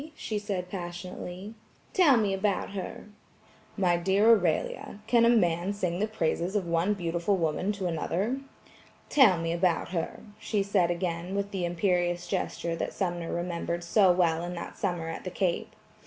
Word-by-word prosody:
she 215 -7 -3
said 195 -3 -3
passionately. 180 +2 -6 0.4
"Tell 310 -9 +6
me 205 -3 +1
about 195 0 0
her." 195 -2 -6 0.7
"My 180 -3 +3
dear 195 +6 +4
Aurelia, 185 -1 +1
can 235 +1 +4
a - - +6
man 180 -4 +2
sing 180 -3 -2
the 215 - +1
praises 180 -2 -1
of 200 -3 +1
one 170 +5 +1
beautiful 170 +2 0
woman 170 +4 0
to 200 -2 -4
another?" 185 - -1 0.7
"Tell 235 -11 +6
me 165 0 -1
about 170 -1 +1
her," 170 -2 -3 0.2
she 205 -3 0
said 195 -3 +2
again 175 +1 -2
with 200 0 -2
the 185 -3 -1
imperious 175 0 0
gesture 170 -1 -2
that - - -3
Sumner 175 -3 -2
remembered 170 0 -2
so 185 +2 +5
well 170 -2 +2
in 175 +1 -4
that 170 - -7
summer 175 -5 -2
at 165 - -5
the 185 - -4
Cape. 180 -1 -1
180 Hz, 165 wpm, -28 LUFS, 170-200 Hz, 0.7 s, Tell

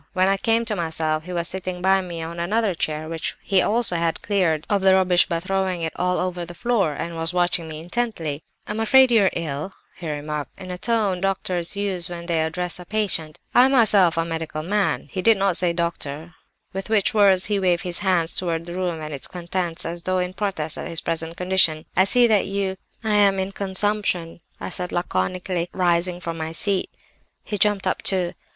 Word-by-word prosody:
When 185 0 +3
I 195 - +2
came 225 +3 +1
to 215 - -1
myself 160 -2 -1
he 180 - -7
was 170 -1 0
sitting 185 -1 -4
by 190 +1 +3
me 170 -3 -6
on 170 +1 -6
another 205 +3 +1
chair, 155 -1 -3
which 165 0 -4
he 195 - +2
had - - +2
also 180 -7 +2
cleared 170 -7 +1
of 205 -2 +1
the 190 0 +5
rubbish 180 -2 +5
by 170 - -1
throwing 185 -1 -1
it 160 - -2
all 180 0 0
over 180 -1 -2
the 175 +1 -8
floor, 200 -7 +1
and 170 +4 -5
was 165 +2 -2
watching 175 -2 +1
me 155 -1 -6
intently. 170 -6 -2 0.2
"'I'm 210 +1 -4
afraid 260 +3 +5
you 220 -4 +5
are - - +4
ill?' 155 +2 -4 0.2
he 170 -3 -6
remarked, 150 +1 -5
in 185 -1 -8
the 180 0 -5
tone 215 -5 +1
which - - -10
doctors 185 -1 -1
use 190 -3 +1
when 170 -1 -7
they 170 -2 0
address 175 +2 -1
a 180 - -9
patient. 175 -7 -1 0.2
'I 250 - +7
am 265 - +2
myself 200 -9 +4
a 165 - +1
medical 160 -2 -4
man' 200 +4 0
(he 185 - -3
did 225 +1 +5
not 195 -2 +1
say 175 0 +2
'doctor'), 170 -2 -4 0.4
with 195 +2 -5
which 215 -3 +2
words 195 -3 +4
he 205 0 0
waved 180 -2 +1
his 175 -2 0
hands 180 -4 +1
towards 170 -2 -1
the 175 - -7
room 175 -3 -2
and 155 0 -6
its 140 - -4
contents 175 -1 -3
as 170 +1 -4
though 185 +2 -1
in 180 0 -1
protest 185 -6 -2
at - - -5
his 165 - -3
present 165 0 -3
condition. 180 -4 +2
'I 185 - +5
see 245 +5 +5
that 215 -4 +3
you—' 195 -1 -2 0.3
"'I'm 205 -3 +3
in 190 +1 -2
consumption,' 195 -4 -1 0.2
I - - -5
said 180 -1 0
laconically, 175 - -2
rising 175 -1 +1
from 165 -2 -5
my 160 0 -4
seat. 195 +2 0 0.5
"He 205 - -4
jumped 205 -1 +2
up, - - 0
too. 180 -3 0
180 Hz, 210 wpm, -23 LUFS, 165-195 Hz, 0.5 s, I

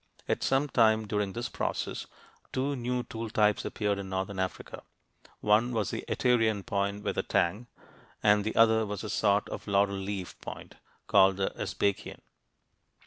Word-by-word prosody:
At - - 0
some 135 +2 +2
time 110 -4 +3
during 105 -2 -1
this 120 +1 -3
process, - - -3 0.4
two 140 +2 -1
new 125 0 -2
tool 115 -1 -6
types 105 -1 +2
appeared 105 -2 -1
in 95 -1 -6
northern 95 +1 -3
Africa: 95 -1 -4 0.6
one 110 +4 +3
was 105 -7 -1
the - - -4
Aterian 115 -5 +2
point 100 -2 -1
with - - -1
a - - +3
tang 100 +8 0
(p. - - -32
67), - - -24 0.3
and 105 -1 +5
the 110 - -3
other 110 0 +5
was 105 -1 -4
a 110 - -4
sort 100 0 +2
of - - -7
"laurel 100 0 +2
leaf" 95 -1 -5
point, - - -8 0.3
called 95 0 +5
the 95 - 0
"Sbaikian." 100 -1 -2
105 Hz, 170 wpm, -29 LUFS, 100-115 Hz, 0.6 s, and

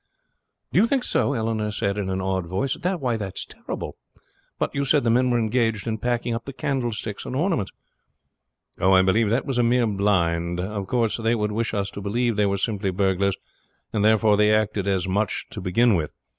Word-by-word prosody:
"Do - - +5
you 225 - +5
think 265 0 +1
so?" 140 - +1
Eleanor 110 -3 -1
said 105 -1 -1
in 95 -2 -2
an 95 0 -1
awed 95 -2 -1
voice. 125 +10 -1
"That 180 -1 -2 0.3
is - - -4
terrible. - - -7 0.6
But - - -1
you 140 - 0
said 140 +1 +3
the 115 - +2
men 125 +2 +3
were 120 - +2
engaged 115 -2 0
in 110 -1 -2
packing 120 -1 -1
up 115 0 -4
the 140 - -7
candlesticks 120 -6 -3
and 130 - -5
ornaments." 150 - 0 1.1
"Oh, 95 +1 +4
I 95 0 +6
believe 105 +3 +2
that 115 +5 +1
was 135 -4 -1
a - - +4
mere 120 +1 +3
blind. 90 -5 +1
Of 100 +1 -3
course 120 -4 +1
they 115 0 +1
would 105 -2 -1
wish 115 +1 -2
us 100 -1 -2
to 100 - -7
believe 115 +3 0
they 105 0 +2
were 100 0 0
simply 100 0 -1
burglars, 95 0 +1 0.6
and 105 - +1
therefore 110 -1 +4
they 105 0 +4
acted 110 -2 +1
as 95 -2 +1
such 100 +2 -1
to - - -6
begin 110 +6 +3
with. 80 -5 -1
110 Hz, 205 wpm, -24 LUFS, 100-120 Hz, 1.1 s, I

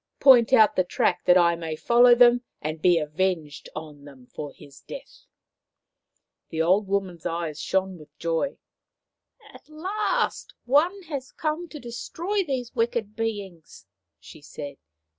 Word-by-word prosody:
Point 250 -4 +7
out 220 -5 +6
the 185 - +3
track 180 0 0
that 180 - +6
I 170 -1 +4
may 165 -2 -5
follow 240 +7 +5
them 245 0 +6 0.2
and 155 +1 -5
be 175 -1 +5
avenged 155 -1 -2
on 150 -2 -9
them 135 -3 -14
for 145 +3 -8
his 140 0 -16
death." - - -11 1.2
The 160 - -5
old 185 +5 +3
woman's 190 -4 -2
eyes 165 -3 -4
shone 190 -2 -1
with 150 -1 -17
joy. 165 +11 -1 0.4
" - - -24
At - - -16
last 380 +8 -2
one 340 +10 +2
has 280 -6 -6
come 315 +3 -3
to 300 - -9
destroy 340 - -3
these 260 -7 -4
wicked 230 -3 -1
beings! 205 - -5 0.2
" - - -60
she 155 - -14
said. 145 -1 -8
190 Hz, 150 wpm, -25 LUFS, 160-255 Hz, 1.2 s, Point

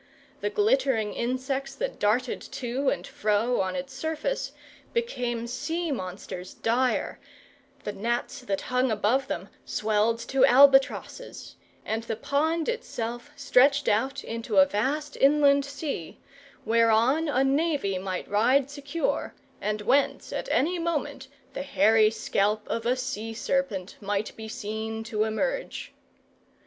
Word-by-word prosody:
The - - -1
glittering 410 - +2
insects 265 +3 -2
that - - -4
darted 240 +5 +1
to 260 +2 -1
and - - -2
fro 215 +3 +1
on 185 -1 -2
its 270 -1 -5
surface 320 - -2 0.4
became 250 - -2
sea 320 +7 -3
monsters 185 -4 -6
dire, 245 +3 0 0.6
the 210 - -3
gnats 235 +7 -2
that 200 -6 -2
hung 255 +1 +1
above 225 +5 +1
them 185 +3 -4
swelled 215 +1 +1
to 270 -1 +3
albatrosses, 275 - +4 0.3
and 220 +1 -1
the 225 -1 -4
pond 315 +7 0
itself 240 - -4
stretched 280 0 +4
out 265 +7 +1
into 230 -2 -3
a 190 - +9
vast 285 +9 -2
inland 280 0 +5
sea, 280 - -5 0.5
whereon 230 +7 +3
a 265 -2 +2
navy 275 - +1
might 185 -1 -4
ride 255 +7 +3
secure, 285 +3 -2 0.3
and 210 0 -1
whence 265 +6 +1
at - - -4
any 345 +5 +1
moment 290 -5 -2 0.3
the - - -4
hairy 225 -6 +4
scalp 215 -1 0
of 230 0 -2
a 250 - +3
sea 225 -3 -4
serpent 220 -7 -2
might 205 +1 -2
be 220 0 -8
seen 220 +1 -4
to 220 -2 -1
emerge. - - -3
250 Hz, 130 wpm, -27 LUFS, 220-280 Hz, 0.6 s, a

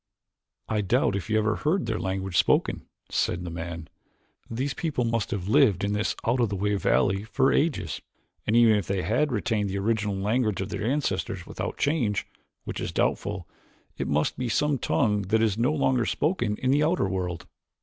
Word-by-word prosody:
"I 110 -1 0
doubt 100 0 +2
if 100 +3 -4
you 110 - +2
ever 110 0 +1
heard 180 +6 0
their 110 -1 -2
language 95 -1 -3
spoken," - - +2 0.2
said 90 - 0
the 85 - -5
man. 85 -1 -6 0.6
"These 130 +5 -2
people 155 -7 -1
must 115 -2 0
have 95 -2 -3
lived 110 - +4
in 100 0 0
this 105 0 0
out 120 +3 +2
of 120 -3 +2
the 100 - -2
way 105 +2 0
valley 100 0 +2
for 130 +5 +2
ages 145 - 0 0.5
and 110 - +2
even 115 -2 +6
if 100 - -3
they 95 -2 -1
had 135 +7 +1
retained 105 -2 0
the 95 - -2
original 105 0 0
language 105 +2 0
of 95 +1 -3
their 100 +1 -4
ancestors 140 +6 -1
without - - -5
change, 130 -9 0 0.4
which - - -5
is - - -3
doubtful, - - -1 0.5
it - - -3
must 75 +1 0
be 125 -1 -1
some 145 +3 +1
tongue 105 -3 +1
that 110 +3 +3
is 110 -3 +2
no 120 +6 +2
longer 130 -5 +1
spoken 120 - 0
in 130 - +1
the 145 +2 +3
outer 165 - +2
world." 90 -3 -3
110 Hz, 190 wpm, -26 LUFS, 95-125 Hz, 0.6 s, even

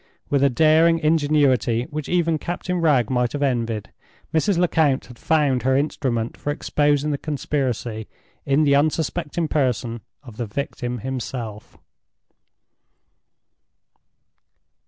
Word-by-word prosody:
With 140 -1 +3
a 140 - +5
daring 160 +5 +4
ingenuity 145 -7 +2
which 150 -1 -5
even 165 -3 +1
Captain 175 +2 -3
Wragge 135 -8 +3
might 125 -1 0
have 145 0 -1
envied, 115 -5 -1 0.4
Mrs. 170 +4 +2
Lecount 160 -6 +2
had 125 -2 -14
found 145 -5 +2
her 130 +1 +2
instrument 125 -5 -1
for - - -5
exposing 145 0 +1
the 140 - -2
conspiracy 130 -7 -3 0.4
in 140 +3 +2
the 140 -2 +3
unsuspecting 155 +2 0
person 125 -6 -1 0.2
of 120 -5 -12
the 120 -2 -3
victim 125 +1 -4
himself! 120 -4 -5
140 Hz, 115 wpm, -22 LUFS, 125-155 Hz, 0.4 s, a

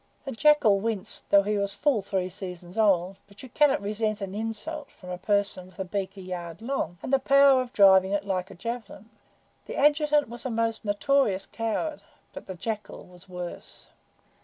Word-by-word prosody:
The 270 - -4
Jackal 230 -6 +4
winced, 215 -1 -3
though 200 0 +6
he 210 0 0
was 200 0 +1
full 255 0 +1
three 190 -2 -2
seasons 180 -1 -8
old, 195 -4 +2
but 200 +3 -14
you 260 - -10
cannot 275 -2 +3
resent 215 +1 -1
an 195 -2 -5
insult 225 +8 -5
from 180 -1 -11
a 180 - -4
person 200 -2 0
with 185 -1 -20
a 190 - -3
beak 195 +1 -4
a - - -8
yard 175 -2 -6
long, 230 -7 -3
and 270 - -4
the 270 - +5
power 275 0 +5
of 250 -1 -6
driving 190 -2 +6
it 200 0 -1
like 185 -2 -2
a - - -11
javelin. 225 +1 -7 0.6
The - - -6
Adjutant 295 0 +3
was 240 +1 -8
a 260 - -3
most 225 -1 -1
notorious 205 -1 +1
coward, 230 +7 -3 0.3
but - - -10
the 190 - -6
Jackal 215 +4 -5
was 180 +1 -17
worse. 180 -1 -8
205 Hz, 190 wpm, -26 LUFS, 190-240 Hz, 0.6 s, though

